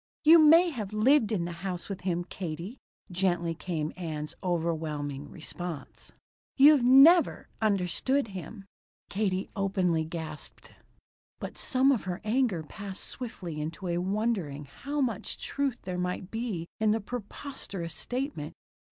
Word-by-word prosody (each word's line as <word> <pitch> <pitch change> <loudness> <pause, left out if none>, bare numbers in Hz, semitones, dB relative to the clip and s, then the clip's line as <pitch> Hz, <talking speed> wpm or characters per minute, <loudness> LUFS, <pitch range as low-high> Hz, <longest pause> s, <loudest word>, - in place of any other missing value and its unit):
"You 325 +2 +9
may 330 +3 +7
have 215 -7 -5
lived 230 +1 +4
in 180 -6 0
the 175 - -4
house 185 -2 -3
with 195 -2 -5
him, 175 -2 -1
Katie," 175 +5 -6 0.3
gently 175 -2 +1
came 160 -1 -3
Ann's 155 -4 -5
overwhelming 155 -5 -2
response. 170 -1 -7 0.5
"You've 290 0 +8
never 275 +8 +6
understood 215 +6 +1
him." 195 +2 -8 0.5
Katie 195 -2 -1
openly 190 -5 +1
gasped. 160 -2 -7 0.7
But - - -6
some 265 +1 +3
of 245 -8 0
her 180 0 -3
anger 215 -6 +1
passed 195 +4 -7
swiftly 180 -11 -6
into 165 +4 -4
a 170 0 0
wondering 190 -7 -1
how 285 - -4
much 255 -3 -1
truth 280 - -2
there 180 -1 -3
might 180 +1 -3
be 225 -7 -3
in 220 -1 +3
the 220 +1 +3
preposterous 205 - -6
statement. 245 - -4
190 Hz, 135 wpm, -29 LUFS, 170-245 Hz, 0.7 s, You